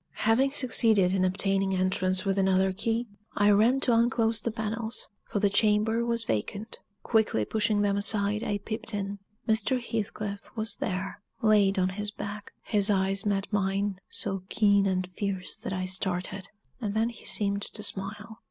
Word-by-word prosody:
Having 260 +5 +3
succeeded 220 -8 +3
in 190 -1 +2
obtaining 195 +1 +1
entrance 185 0 +1
with 195 0 +1
another 190 0 +3
key, 225 +4 -1 0.3
I 205 0 +4
ran 225 +6 +4
to 245 - +3
unclose 230 -1 +2
the 230 - -1
panels, 225 +1 -4 0.2
for 205 - -1
the 205 - +3
chamber 215 +3 +2
was 235 -1 0
vacant 200 - -3 0.2
quickly 220 - +2
pushing 210 - +1
them 200 -1 +1
aside, 205 +1 +2
I 205 -3 -1
peeped 220 +1 -2
in. 200 0 -3 0.3
Mr. 225 +3 +2
Heathcliff 210 -3 -4 0.2
was 220 +1 -3
there 190 +1 -3 0.2
laid 205 -2 +4
on 185 0 +2
his 205 +2 -3
back. 205 0 -7
His 205 -1 +3
eyes 195 +1 +1
met 200 +1 -1
mine, 195 -1 0
so 195 -1 -2
keen 200 -2 +3
and 185 -1 0
fierce 195 -3 -3
that - - -6
I 185 -1 -2
started; 185 0 -1 0.3
and 210 -4 -3
then 225 +2 +2
he 235 - -12
seemed 200 -1 -1
to 210 +1 -6
smile. 210 +3 -6
205 Hz, 165 wpm, -28 LUFS, 195-220 Hz, 0.3 s, I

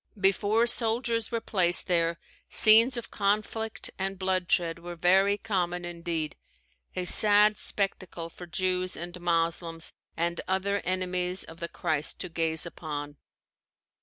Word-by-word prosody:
Before 205 +4 +3
soldiers 230 -1 +2
were 230 - -1
placed 180 -6 +2
there, 170 -1 +2 0.3
scenes 230 +3 +6
of 235 - -6
conflict 215 +2 -1
and 195 0 -2
bloodshed 180 -3 0
were 175 +1 -7
very 190 +4 +4
common 180 -5 -2
indeed 170 -3 -3 0.6
a 180 - -2
sad 210 +2 +4
spectacle 185 -5 -3
for 175 +1 -11
Jews 185 +1 0
and 175 +1 -7
Moslems 165 -1 -1 0.2
and 170 +1 -1
other 195 +2 0
enemies 180 0 -1
of 165 +1 -12
the 170 - -4
Christ 155 0 -1
to 180 - -4
gaze 160 -1 -1
upon. 145 -3 -6
180 Hz, 130 wpm, -28 LUFS, 170-200 Hz, 0.6 s, scenes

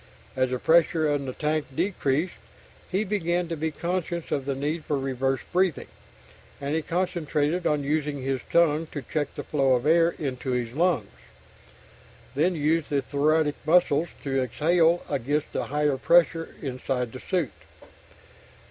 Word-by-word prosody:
As 130 -1 +1
the 125 - -1
pressure 160 +2 +3
in 140 -2 -2
the 130 - -4
tank 155 +1 -1
decreased, 170 -2 0 0.6
he 190 +3 +1
began 180 -4 0
to 165 - -2
be 160 +1 -1
conscious 170 +1 -3
of 140 -2 -1
the 140 -1 -1
need 150 +4 -2
for 145 - -1
"reverse 135 0 -1
breathing" 180 -4 +1 0.7
and 140 +1 -3
he 160 - +1
concentrated 170 -1 -1
on 150 -2 +1
using 145 0 -1
his 135 -1 -1
tongue 165 -1 +3
to 145 - -4
check 150 -2 -3
the - - -5
flow 135 -3 +2
of 125 +2 -2
air 165 +2 +4
into 130 -3 -3
his 120 -2 -2
lungs, 165 - +2 1.3
then 165 +6 +2
using 150 -1 +1
the 140 - 0
thoracic 150 +2 +1
muscles 160 -1 +3 0.2
to 135 -2 0
exhale 165 +7 +2
against 145 +2 -1
the - - -1
higher 150 -1 0
pressure 165 +3 +3
inside 125 -2 -2
the 130 - -8
suit. 175 -6 -1
150 Hz, 155 wpm, -26 LUFS, 135-170 Hz, 1.3 s, air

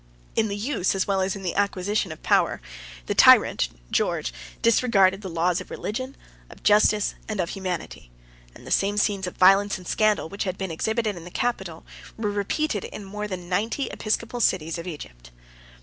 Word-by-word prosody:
In 220 - +2
the 200 0 -3
use, 210 -4 0
as 190 - +1
well 195 -1 +1
as 190 +1 0
in 195 - -8
the 180 - -1
acquisition, 200 -1 0
of 155 - -10
power, - - +2 0.5
the - - -1
tyrant, - - +6 0.2
George - - 0 0.3
disregarded 205 -5 +4
the 190 - -6
laws 175 +2 0
of - - -11
religion, 255 +5 -5 0.3
of - - -15
justice, 210 0 +4 0.2
and 215 -2 -3
of 170 -2 0
humanity; 180 - -5 0.5
and - - -14
the - - -8
same 200 +1 +2
scenes 200 -2 +1
of 180 - -7
violence 195 +2 +5
and 180 -2 -12
scandal 215 -5 +2
which 200 +5 -4
had 185 -1 -3
been 190 -3 -4
exhibited 220 +5 -1
in 170 - -9
the 175 - -9
capital, 190 -6 -3 0.3
were 215 -2 -1
repeated 205 - -1
in 205 - -8
more 210 +2 -5
than 180 -3 -6
ninety 215 +9 -1
episcopal 230 +2 -2
cities 165 -5 +1
of 170 - -7
Egypt. - - -9
195 Hz, 185 wpm, -25 LUFS, 180-210 Hz, 0.5 s, tyrant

